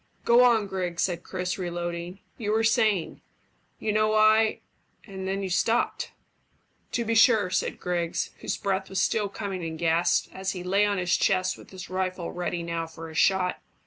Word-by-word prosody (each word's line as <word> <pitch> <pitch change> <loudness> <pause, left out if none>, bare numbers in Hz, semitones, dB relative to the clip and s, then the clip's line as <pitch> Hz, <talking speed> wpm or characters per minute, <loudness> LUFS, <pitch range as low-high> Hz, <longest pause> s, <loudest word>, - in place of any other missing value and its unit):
"Go 235 +1 +6
on, 230 -4 +4
Griggs," 180 -3 -2
said 175 -2 -1
Chris, 180 +1 -4
reloading. 175 +1 -4 0.2
"You 210 -2 -1
were 225 +1 +2
saying, 215 -5 +1 0.6
`You 215 - -1
know 215 0 +2
I 215 0 +4 0.2
' - - -29
and 190 -2 -6
then 195 +1 -2
you 190 - -3
stopped." 225 +6 +1 0.8
"To 235 - 0
be 230 - 0
sure," 220 -4 +5
said - - -1
Griggs, 175 -2 -2
whose - - -3
breath 190 -1 -2
was 190 - -2
still 205 +1 +1
coming 195 -2 -5
in 160 -1 -5
gasps, 170 +1 +2
as 190 0 -3
he 180 -2 -6
lay 200 +3 +2
on 205 -1 0
his 180 -1 +1
chest 185 -1 +1
with - - -15
his 185 -1 -9
rifle 185 -2 -2
ready 175 -1 -3
now 170 -1 -3
for 165 0 -9
a - - -11
shot. 180 +2 +2
190 Hz, 185 wpm, -26 LUFS, 175-210 Hz, 0.8 s, Go